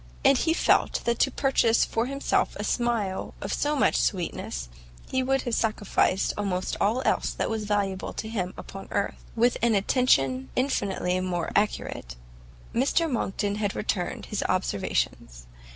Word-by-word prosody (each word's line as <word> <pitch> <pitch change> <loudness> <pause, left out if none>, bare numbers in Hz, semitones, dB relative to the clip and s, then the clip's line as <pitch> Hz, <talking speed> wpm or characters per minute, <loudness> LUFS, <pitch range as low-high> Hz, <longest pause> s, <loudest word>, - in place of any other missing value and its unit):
and 270 -2 +6
he 325 - +2
felt 330 - +2
that 235 0 +1
to - - +4
purchase 255 -4 +3
for 225 +2 -1
himself 275 +1 0
a - - -4
smile 230 -6 -1
of - - -3
so 295 +1 0
much 280 - +3
sweetness, 165 - -1 0.4
he 260 - +2
would 270 +1 +1
have 240 - -3
sacrificed 215 -4 +1
almost 185 -3 -1
all 230 +6 +2
else - - +2
that - - -2
was 220 -1 -2
valuable 200 -2 -1
to 220 - -5
him 190 -5 -2
upon 195 0 -9
earth. 200 - -2
With 240 +2 +3
an 235 -2 +3
attention 135 - +2
infinitely 195 -8 0
more 180 -2 -2
accurate, 200 - -1 0.6
Mr 275 +7 +2
Monckton 205 -6 -1
had 205 -2 -1
returned 185 -4 -2
his 210 - -3
observations. - - -1
210 Hz, 150 wpm, -26 LUFS, 185-245 Hz, 0.6 s, and